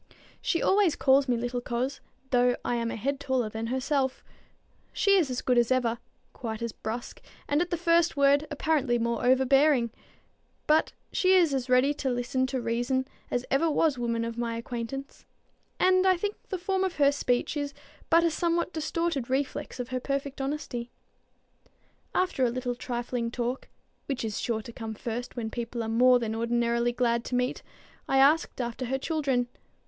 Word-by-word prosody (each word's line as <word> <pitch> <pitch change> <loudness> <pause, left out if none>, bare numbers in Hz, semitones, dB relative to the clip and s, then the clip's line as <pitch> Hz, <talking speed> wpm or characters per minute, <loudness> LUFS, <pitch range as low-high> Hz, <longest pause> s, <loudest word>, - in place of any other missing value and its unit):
She 335 - 0
always 390 -5 +3
calls 270 +1 +4
me 245 -2 +2
little 245 +1 -2
coz, 250 +3 -3 0.3
though 245 -1 +4
I - - 0
am 230 -1 -1
a - - -4
head 275 +5 -2
taller 260 -5 0
than 220 +1 -4
herself. 260 +1 -1 0.7
She 400 -1 +3
is 340 -8 +3
as 250 0 -3
good 250 -1 +3
as 235 - +2
ever, 240 -2 +1 0.3
quite 225 -2 -5
as 235 - -2
brusque, 225 +3 -6 0.3
and 290 +2 +2
at 350 - -1
the 345 - -1
first 335 -1 +2
word 280 +2 +4
apparently 290 -4 +1
more 235 0 -1
overbearing. 265 -1 +4 0.7
But 310 +1 +3 0.2
she 375 0 +4
is 340 -6 +4
as 260 -1 -2
ready 255 +3 +4
to 280 -2 -2
listen 250 +1 0
to 260 0 -2
reason 245 +3 -1 0.2
as 245 +1 -1
ever 300 +5 +3
was 300 -3 +2
woman 230 -1 -1
of 230 0 -5
my 230 -1 -2
acquaintance; 240 +4 -6 0.5
and 370 0 +4
I 370 -1 +4
think 410 +4 -2 0.2
the 380 - -2
form 380 +2 0
of 375 -2 -1
her 285 -1 +4
speech 250 -1 0
is 285 -1 -3 0.3
but 335 +1 +5
a 335 - +3
somewhat 340 +2 0
distorted 315 -4 -2
reflex 265 -1 -2
of 245 - -4
her 255 0 -2
perfect 275 +1 -3
honesty. 270 -4 -4 1.3
After 365 -8 +1
a 245 - +4
little 245 +1 -2
trifling 240 -1 -3
talk, 245 +2 -3 0.4
which 265 -4 -2
is 215 -2 -3
sure 220 -2 -2
to 235 - -10
come 225 -2 -6
first 240 +2 -5
when 225 -3 -4
people 235 0 -4
are - - -4
more 250 +3 +5
than 230 -2 -2
ordinarily 235 +1 +1
glad 235 -1 +1
to 250 - -2
meet, 250 +1 0 0.5
I 270 - +3
asked 285 +3 +4
after 240 +1 -3
her 265 +2 -1
children. 270 -4 0
255 Hz, 180 wpm, -28 LUFS, 240-290 Hz, 1.3 s, but